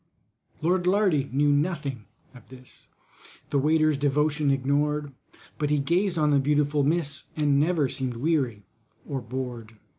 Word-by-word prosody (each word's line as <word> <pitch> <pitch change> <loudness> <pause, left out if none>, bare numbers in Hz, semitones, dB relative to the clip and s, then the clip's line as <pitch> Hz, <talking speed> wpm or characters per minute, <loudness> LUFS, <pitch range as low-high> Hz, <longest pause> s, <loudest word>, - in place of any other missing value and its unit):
LORD 180 +2 +1
LARDY 180 -8 +2
knew 145 +2 +2
nothing 145 - -1 0.3
of 125 -3 -16
this— 130 -1 -15 0.6
The 140 - +2
waiter's 155 0 +2
devotion 150 +1 +1
ignored, 145 +2 0 0.5
But 150 -1 0
he 150 - +2
gazed 175 +6 0
on 150 -1 +2
the 140 - +4
beautiful 145 +1 +1
miss, 145 -1 0
And 145 -2 +2
never 155 -2 +2
seemed 130 -2 -4
weary 125 -7 -1 0.4
or 135 -2 -3
bored. 120 -2 -6
145 Hz, 140 wpm, -26 LUFS, 135-155 Hz, 0.6 s, the